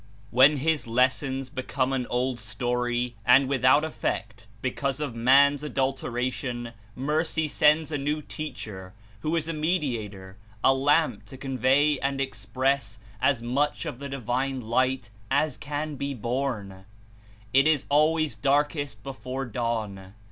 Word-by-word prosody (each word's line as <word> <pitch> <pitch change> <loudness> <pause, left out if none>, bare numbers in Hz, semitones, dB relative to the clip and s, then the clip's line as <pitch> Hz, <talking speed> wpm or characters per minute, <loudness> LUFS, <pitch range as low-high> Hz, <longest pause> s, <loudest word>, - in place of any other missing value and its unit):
When 135 +5 +6
his 155 -1 0
lessons 130 +2 +1
become 130 -1 -1
an 125 -2 -1
old 125 0 -1
story 120 +1 -2
and 130 +4 +6
without 135 +2 +4
effect 110 -9 -4
because 135 +3 -2
of 145 -5 -3
man's 135 +4 +5
adulteration, 125 -3 -2 0.2
Mercy 155 +3 0
sends 150 +1 +3
a 145 - -1
new 150 +2 -1
teacher 105 -13 -7 0.3
who 155 +7 -1
is 160 -1 -1
a 165 - -2
Mediator, 115 - -2 0.3
a 135 - +6
Lamp 135 -5 +2
to 130 +5 -11
convey 135 +2 +2
and 140 0 -1
express 130 -1 -1 0.2
as 115 - +2
much 140 +5 0
of 120 - -5
the 140 0 -6
divine 130 +1 -2
Light 120 -1 0 0.2
as 145 0 +1
can 150 0 -4
be 140 0 -3
borne. 115 -6 -3 0.7
It 135 +3 +5
Is 155 -4 +2
always 155 +1 +2
"darkest 145 -4 0
before 135 0 -5
dawn." 105 -5 -3
130 Hz, 135 wpm, -26 LUFS, 120-145 Hz, 0.7 s, When